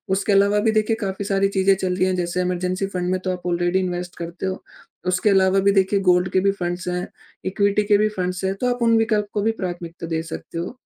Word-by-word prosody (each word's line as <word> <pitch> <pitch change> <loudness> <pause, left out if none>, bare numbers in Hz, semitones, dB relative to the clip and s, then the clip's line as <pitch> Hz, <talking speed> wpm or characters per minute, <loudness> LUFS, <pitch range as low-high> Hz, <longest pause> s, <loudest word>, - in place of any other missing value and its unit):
उसके 200 +1 0
अलावा 200 +1 +4
भी - - +4
देखिए 220 +1 +1
काफ़ी 195 0 -3
सारी 195 0 +2
चीज़ें 190 +1 +4
चल 185 -1 -2
रही 185 0 +2
हैं 185 - 0
जैसे 175 0 -1
इमरजेंसी 180 +1 -1
फंड 180 0 -1
में 185 - 0
तो 185 - +1
आप 180 -1 -5
ऑलरेडी 175 +1 +1
इन्वेस्ट 180 -1 -3
करते 170 +2 -6
हो, 190 0 -3 0.4
उसके 185 +3 +2
अलावा 190 -1 +4
भी 200 +1 +3
देखिए 195 +1 0
गोल्ड 180 +1 +2
के 190 - +4
भी 195 +1 +3
फंड्स 175 +1 -3
हैं, 180 0 -2 0.4
इक्विटी 200 +2 +1
के 205 0 +4
भी 215 +1 +2
फंड्स 180 0 -2
हैं, 190 - +1
तो 250 +6 -2
आप 245 - -10
उन 230 -1 +4
विकल्प 220 -2 +1
को 210 - 0
भी 220 +2 +2
प्राथमिकता 175 -2 -5
दे 160 -1 -2
सकते 165 0 -8
हो। 170 +8 -4
185 Hz, 245 wpm, -22 LUFS, 180-200 Hz, 0.4 s, अलावा